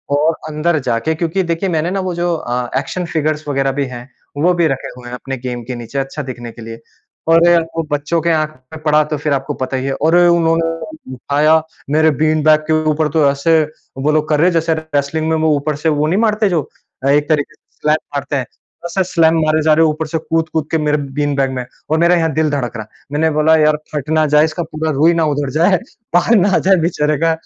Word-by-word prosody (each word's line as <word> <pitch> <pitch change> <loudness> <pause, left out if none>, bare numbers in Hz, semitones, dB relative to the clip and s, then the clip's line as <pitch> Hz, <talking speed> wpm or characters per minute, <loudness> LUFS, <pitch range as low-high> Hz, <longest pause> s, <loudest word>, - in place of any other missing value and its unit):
और 155 +3 +2 0.2
अंदर 155 +1 0
जाके 115 +8 0
क्योंकि 170 +4 -1
देखिए 170 +2 -1
मैंने 165 0 -1
ना 195 - -1
वो 185 -1 -2
जो 175 0 0
अ, 125 -5 -3
एक्शन 180 +5 -4
फ़िगर्स 155 -1 -1
वग़ैरह 135 -1 0
भी 140 +1 -1
हैं 125 0 -9 0.3
वो 180 +1 +4
भी 170 -2 +2
रखे 135 -3 -3
हुए 125 -1 -11
हैं - - -9
अपने 135 +1 -6
गेम 120 -1 -5
के 125 +1 -5
नीचे 120 +3 -5
अच्छा 135 +3 -4
दिखने 120 -3 -7
के 115 - -13
लिए। 115 +1 -9 0.5
और 165 0 +5 0.4
वो 165 - +1
बच्चों 145 +3 0
के 170 - 0
आँख 155 -1 +1 0.2
में 160 - -8
पड़ा 150 0 +4
तो 150 - -1
फ़िर 150 0 -1
आपको 135 +2 -2
पता 130 0 -2
ही 130 - -3
है। 135 - -1
और 160 +5 +1
उन्होंने 165 -2 +3 0.5
उठाया 150 +5 +2 0.3
मेरे 155 +1 +4
बीन 155 0 +2
बैग 155 0 +5
के 160 - +2 0.2
ऊपर 155 0 0
तो 150 -1 +3
ऐसे 155 +3 +2 0.4
वो 145 +3 +1
लोग 155 0 +1
कर 150 -1 +2
रहे 170 - +4
हैं 180 - +2
जैसे 165 0 +1
रेसलिंग 160 0 -2
में 160 - +2
वो 160 0 +1
ऊपर 145 +1 -2
से 160 +2 0
वो 150 0 +1
नहीं 180 +6 +1
मारते 215 -2 +2
जो 165 -5 -1 0.4
एक 145 +2 +2
तरीके 155 -1 0
से - - -53 0.2
स्लैम 150 0 +3 0.2
मारते 140 +1 -2
हैं। 130 - -2 0.4
ऐसे 190 +2 0
स्लैम 165 -1 +4
मारे 155 0 +2
जा 155 0 +4
रहे 160 +1 +4
हैं - - +3
ऊपर 155 +1 -4
से 160 - -2
कूद-कूद 160 -1 -2
के 165 - +2
मेरे 150 0 +1 0.2
बीन 145 -1 0
बैग 135 -1 +1
में 125 -1 -4 0.2
और 155 - +2
मेरा 170 +1 +4
यहाँ 165 -2 +1
दिल 155 +1 +1
धड़क 130 -5 -2
रहा 110 - -5
है। - - -28
मैंने 160 +2 +2
बोला 160 +1 +4
यार 155 -1 +3 0.2
फट 150 -1 -4
ना 155 0 +3
जाए 150 +1 +6
इसका 160 +2 -3
पूरा 155 0 -3
रुई 155 +4 +3
ना 165 -1 +1
उधड़ 145 -2 -1
जाए, 175 +7 +3 0.4
बाहर 200 +7 +4
ना 200 +2 +3
आ - - +4
जाए 195 +1 +4
बेचारे 155 -3 0
का 165 - +3
155 Hz, 245 wpm, -16 LUFS, 140-165 Hz, 0.5 s, जाए